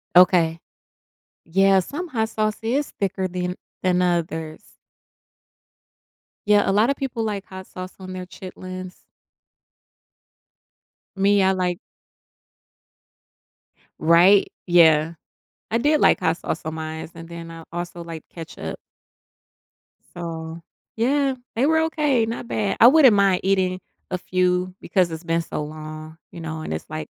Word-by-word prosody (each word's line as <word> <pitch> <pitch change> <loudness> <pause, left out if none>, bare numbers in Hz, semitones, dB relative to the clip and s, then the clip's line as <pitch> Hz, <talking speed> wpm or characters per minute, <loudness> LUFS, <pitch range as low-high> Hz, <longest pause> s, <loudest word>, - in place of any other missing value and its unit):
Okay. 175 -2 +5 0.8
Yeah, 195 +3 +4
some 305 - -5
hot 220 -7 -1
sauce 215 -1 -1
is 260 +6 0
thicker 190 -1 -1
than 180 0 -3 0.3
than 180 -1 +2
others. 165 -3 -2 1.7
Yeah, 205 -1 +4
a - - +2
lotta 220 +7 +3
people 260 -5 -3
like 205 -2 -3
hot 190 0 -10
sauce 185 0 -8
on 185 0 -8
their 185 0 -6
chitlins. 185 0 -9 2.1
Me, 200 0 +3
I 190 - +4
like 180 -2 -1 2.2
Right? 175 +5 +5 0.2
Yeah. 165 -2 +5 0.6
I 230 - +2
did 295 +6 +2
like - - +5
hot - - +1
sauce - - -4
on 155 - -3
my 160 - -5 0.2
mine's 160 - -8
and 165 0 -11
then 170 -1 -8
I 165 0 -10
also 175 0 -5
like 165 -2 -8
ketchup. 160 - -7 1.4
So, 165 -1 -6 0.3
yeah, 270 +4 +2 0.2
they 240 +4 +2
were 320 +1 +3
okay, 295 -7 +1
not 230 +1 -5
bad. 210 -4 -1
I 230 - +9
wouldn't 265 -5 +7
mind 195 -2 +3
eating 185 -1 +1 0.3
a 185 - 0
few 180 0 0
because 185 -3 +1
it's 160 +1 -6
been 165 0 0
so 155 - -4
long, 155 +1 -8
you 170 - -9
know, 160 -1 -5
and 120 - -4
it's 80 - -6
like 155 0 -5
185 Hz, 135 wpm, -23 LUFS, 165-210 Hz, 2.2 s, I